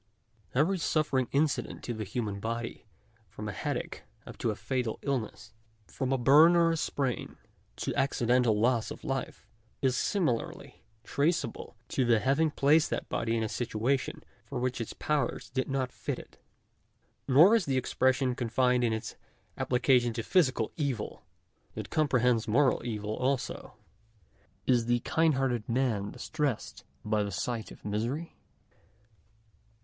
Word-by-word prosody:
Every 170 Hz, +8 st, +2 dB
suffering 150 Hz, -6 st, +1 dB
incident 145 Hz, +1 st, 0 dB
to 120 Hz, -, -3 dB
the 110 Hz, -1 st, -4 dB
human 105 Hz, -1 st, -3 dB
body, 115 Hz, +1 st, -4 dB, 0.4 s
from 105 Hz, -, -7 dB
a -, -, -2 dB
headache -, -, -4 dB, 0.2 s
up -, -, -9 dB
to -, -, 0 dB
a -, -, -1 dB
fatal 125 Hz, -4 st, -2 dB
illness 115 Hz, -5 st, -3 dB, 0.2 s
— 110 Hz, 0 st, -38 dB
from 130 Hz, -1 st, -3 dB
a 135 Hz, -, +3 dB
burn 150 Hz, +7 st, +7 dB
or 170 Hz, -1 st, +4 dB
a 165 Hz, -, 0 dB
sprain, 135 Hz, -4 st, -2 dB, 0.4 s
to -, -, -3 dB
accidental 120 Hz, -4 st, +2 dB
loss 115 Hz, 0 st, +2 dB
of -, -, -9 dB
life, 135 Hz, -4 st, -4 dB, 0.3 s
is 130 Hz, -2 st, +1 dB
similarly 170 Hz, -, -1 dB, 0.2 s
traceable 145 Hz, -2 st, -1 dB
to 130 Hz, -, +1 dB
the 120 Hz, -2 st, +4 dB
having 140 Hz, +7 st, +2 dB
placed 150 Hz, +2 st, +3 dB
that -, -, -3 dB
body 115 Hz, 0 st, 0 dB
in 110 Hz, -, 0 dB
a -, -, 0 dB
situa 120 Hz, +4 st, 0 dB
tion -, -, -7 dB, 0.2 s
for -, -, -6 dB
which 125 Hz, -1 st, -1 dB
its 115 Hz, -, -5 dB
powers 150 Hz, -1 st, -2 dB
did 130 Hz, +1 st, -1 dB
not 135 Hz, -2 st, -1 dB
fit -, -, -4 dB
it. -, -, -13 dB, 0.9 s
Nor 160 Hz, -, +7 dB
is 220 Hz, -7 st, +2 dB
the 135 Hz, -2 st, 0 dB
expression 130 Hz, 0 st, +1 dB
confined 125 Hz, +1 st, +1 dB
in 115 Hz, -2 st, +2 dB
its 110 Hz, +1 st, -4 dB, 0.4 s
application 125 Hz, -1 st, +2 dB
to 115 Hz, -, -3 dB
physical 130 Hz, -, +2 dB
evil; 140 Hz, -8 st, -3 dB, 0.5 s
it -, -, -6 dB
comprehends 125 Hz, -6 st, +2 dB
moral 130 Hz, +5 st, +3 dB
evil 105 Hz, -2 st, -3 dB
also. 130 Hz, 0 st, -2 dB, 0.9 s
Is 120 Hz, -3 st, +2 dB
the 120 Hz, 0 st, +2 dB
kindhearted 135 Hz, -9 st, +1 dB
man 115 Hz, -5 st, 0 dB
distressed 150 Hz, -7 st, -3 dB, 0.2 s
by 105 Hz, 0 st, +1 dB
the 100 Hz, -, -2 dB
sight 115 Hz, -1 st, -3 dB
of -, -, -14 dB
misery 120 Hz, +11 st, -3 dB
125 Hz, 150 wpm, -30 LUFS, 115-140 Hz, 0.9 s, burn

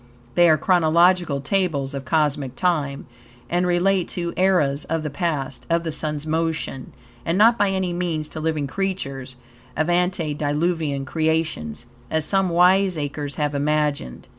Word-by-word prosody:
They 175 Hz, -1 st, +5 dB
are 155 Hz, -, +5 dB
chronological 170 Hz, -2 st, +3 dB
tables 145 Hz, -4 st, -1 dB
of 135 Hz, -1 st, -5 dB
cosmic 145 Hz, -3 st, 0 dB
time, 150 Hz, -6 st, -1 dB, 0.5 s
and 175 Hz, +1 st, +1 dB
relate 180 Hz, +1 st, +2 dB
to 170 Hz, -1 st, -3 dB
eras 155 Hz, -7 st, +2 dB
of 165 Hz, -1 st, -2 dB
the 150 Hz, -, -4 dB
past, 140 Hz, -4 st, -3 dB
of 170 Hz, 0 st, +1 dB
the 165 Hz, -, -3 dB
Sun's 150 Hz, -1 st, -2 dB
motion, 160 Hz, -4 st, -2 dB, 0.3 s
and 165 Hz, +2 st, 0 dB
not 225 Hz, +3 st, +6 dB
by 205 Hz, -3 st, +2 dB
any 190 Hz, -2 st, -1 dB
means 170 Hz, -3 st, -2 dB
to 155 Hz, -, -6 dB
living 155 Hz, -2 st, -1 dB
creatures 135 Hz, -7 st, -4 dB, 0.4 s
of 155 Hz, +3 st, +1 dB
antediluvian 155 Hz, -3 st, 0 dB
creations, 155 Hz, -, -1 dB, 0.2 s
as 160 Hz, -1 st, 0 dB
some 195 Hz, +1 st, +2 dB
wiseacres 170 Hz, -6 st, +2 dB
have 150 Hz, -1 st, -1 dB
imagined. 145 Hz, -, -1 dB
160 Hz, 140 wpm, -22 LUFS, 145-175 Hz, 0.5 s, not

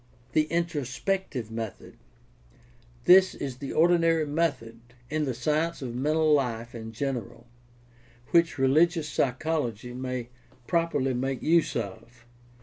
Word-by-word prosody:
The 155 Hz, +3 st, +3 dB
introspective 155 Hz, -, -2 dB
method. 110 Hz, -2 st, -6 dB, 0.6 s
— 120 Hz, 0 st, -29 dB
This 185 Hz, +1 st, +7 dB
is 135 Hz, -3 st, -5 dB
the 140 Hz, 0 st, -6 dB
ordinary 165 Hz, -1 st, +3 dB
method 145 Hz, -7 st, -1 dB, 0.3 s
in 155 Hz, -1 st, 0 dB
the 130 Hz, -3 st, -2 dB
science 155 Hz, +5 st, -1 dB
of 120 Hz, -2 st, -5 dB
mental 155 Hz, +4 st, +2 dB
life 120 Hz, -4 st, 0 dB
in 115 Hz, -1 st, -7 dB
general, 120 Hz, -2 st, -4 dB, 0.9 s
which 170 Hz, -1 st, +3 dB
religious 155 Hz, +4 st, +3 dB
psy 135 Hz, -3 st, +1 dB
chology 125 Hz, -6 st, -3 dB
may 125 Hz, -2 st, -4 dB, 0.4 s
properly 165 Hz, -6 st, +1 dB
make 130 Hz, +1 st, -2 dB
use 165 Hz, +1 st, +3 dB
of. 115 Hz, +4 st, -6 dB
135 Hz, 125 wpm, -27 LUFS, 120-160 Hz, 0.9 s, This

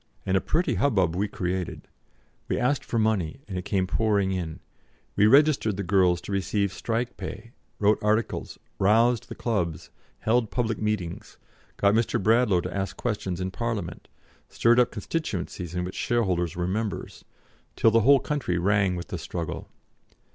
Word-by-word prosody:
And 95 Hz, -1 st, +1 dB
a 95 Hz, -, +3 dB
pretty 170 Hz, -, 0 dB
hubbub 95 Hz, -12 st, +2 dB
we 100 Hz, +3 st, 0 dB
created; 90 Hz, -2 st, -4 dB, 0.6 s
we -, -, -1 dB
asked 135 Hz, +3 st, +1 dB
for 115 Hz, -, -3 dB
money, 110 Hz, -3 st, 0 dB
and 95 Hz, -, -6 dB
it 90 Hz, -, -4 dB
came 95 Hz, -2 st, +1 dB
pouring 100 Hz, -1 st, +1 dB
in; 85 Hz, -4 st, -3 dB, 0.6 s
we 105 Hz, +1 st, +5 dB
registered 135 Hz, -6 st, +4 dB
the 100 Hz, -, -2 dB
girls 90 Hz, -2 st, +3 dB
to 100 Hz, -, -8 dB
receive 100 Hz, 0 st, 0 dB
strike 120 Hz, +4 st, -2 dB
pay, 115 Hz, -, -7 dB, 0.3 s
wrote 105 Hz, 0 st, +3 dB
articles, 110 Hz, +2 st, 0 dB, 0.2 s
roused 115 Hz, +4 st, +3 dB
the -, -, -6 dB
clubs, 90 Hz, -9 st, -2 dB, 0.3 s
held 115 Hz, 0 st, +2 dB
public 115 Hz, -4 st, -1 dB
meetings, 105 Hz, -6 st, -3 dB, 0.4 s
got 100 Hz, 0 st, +3 dB
Mr. 115 Hz, +1 st, +1 dB
Bradlaugh 110 Hz, -3 st, +3 dB
to -, -, -5 dB
ask 100 Hz, 0 st, -3 dB
questions 100 Hz, -6 st, -2 dB
in 95 Hz, 0 st, -2 dB
Parliament, 110 Hz, -5 st, -4 dB, 0.4 s
stirred 120 Hz, +1 st, +3 dB
up 125 Hz, -, +4 dB
constituencies 95 Hz, -, -4 dB
in 90 Hz, -, -1 dB
which 90 Hz, +1 st, -5 dB
shareholders 90 Hz, -9 st, 0 dB
were 90 Hz, 0 st, -1 dB
members, 105 Hz, +3 st, -3 dB, 0.5 s
till 115 Hz, -, +4 dB
the 115 Hz, -, +5 dB
whole 140 Hz, +5 st, +6 dB
country 130 Hz, -11 st, -2 dB
rang 100 Hz, +1 st, +2 dB
with 85 Hz, -, -6 dB
the -, -, -4 dB
struggle. 85 Hz, -2 st, -5 dB
100 Hz, 160 wpm, -26 LUFS, 90-115 Hz, 0.6 s, whole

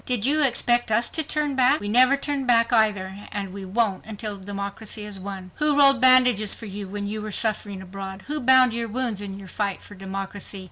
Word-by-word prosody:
Did 245 Hz, -4 st, -1 dB
you 300 Hz, +3 st, +2 dB
expect 240 Hz, -3 st, +2 dB
us 235 Hz, +3 st, +2 dB
to 320 Hz, -, +2 dB
turn 300 Hz, -2 st, -2 dB
back? 260 Hz, 0 st, +3 dB
We 205 Hz, -, -6 dB
never 255 Hz, +5 st, +4 dB
turn 280 Hz, -2 st, -3 dB
back, 230 Hz, 0 st, +3 dB
either—and 200 Hz, -2 st, -2 dB
we 195 Hz, -1 st, -8 dB
won't 200 Hz, 0 st, -1 dB
until 210 Hz, -1 st, -6 dB
democracy 200 Hz, +2 st, -5 dB
is 205 Hz, -2 st, -5 dB
won! 190 Hz, -1 st, -8 dB
Who 300 Hz, -1 st, 0 dB
rolled 275 Hz, -3 st, +5 dB
bandages 250 Hz, -5 st, +6 dB
for 230 Hz, -, -9 dB
you 200 Hz, -1 st, -7 dB
when 205 Hz, +1 st, -6 dB
you 210 Hz, +1 st, -5 dB
were 215 Hz, 0 st, -7 dB
suffering 205 Hz, -2 st, -2 dB
abroad? 190 Hz, +1 st, -9 dB
Who 300 Hz, +1 st, -4 dB
bound 255 Hz, -2 st, +5 dB
your 230 Hz, 0 st, -3 dB
wounds 230 Hz, -2 st, -3 dB
in 195 Hz, -1 st, -7 dB
your 195 Hz, -1 st, -12 dB
fight 200 Hz, 0 st, -4 dB
for -, -, -13 dB
democracy? 195 Hz, +1 st, -6 dB
215 Hz, 205 wpm, -23 LUFS, 200-250 Hz, -, bandages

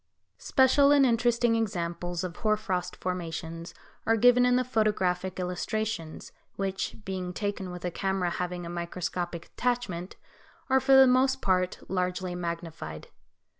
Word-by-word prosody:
Special 275 Hz, +2 st, +4 dB
and 285 Hz, -2 st, +6 dB
interesting 235 Hz, -1 st, +2 dB
examples 175 Hz, -5 st, -2 dB
of 180 Hz, -2 st, -5 dB
hoar 215 Hz, -1 st, +1 dB
frost 185 Hz, -4 st, -3 dB
formations 165 Hz, -2 st, -5 dB, 0.3 s
are 225 Hz, 0 st, +4 dB
given 245 Hz, +2 st, +5 dB
in 250 Hz, -, +4 dB
the 255 Hz, -, +3 dB
photographic 190 Hz, -6 st, 0 dB
illustrations, 180 Hz, -1 st, -3 dB, 0.2 s
which, 195 Hz, -1 st, -2 dB
being 185 Hz, -2 st, -4 dB
taken 200 Hz, -1 st, -3 dB
with 180 Hz, 0 st, -7 dB
a 180 Hz, -, -1 dB
camera 190 Hz, -1 st, -1 dB
having 180 Hz, 0 st, -3 dB
a -, -, -6 dB
microscopic 175 Hz, 0 st, -4 dB
attachment 240 Hz, -8 st, -2 dB, 0.6 s
are, 265 Hz, -, +6 dB
for 265 Hz, +1 st, +4 dB
the 265 Hz, 0 st, +9 dB
most 260 Hz, +1 st, +3 dB
part, 185 Hz, -1 st, 0 dB
largely 180 Hz, -1 st, -2 dB
magnified. 170 Hz, -, -6 dB
185 Hz, 135 wpm, -28 LUFS, 175-230 Hz, 0.6 s, the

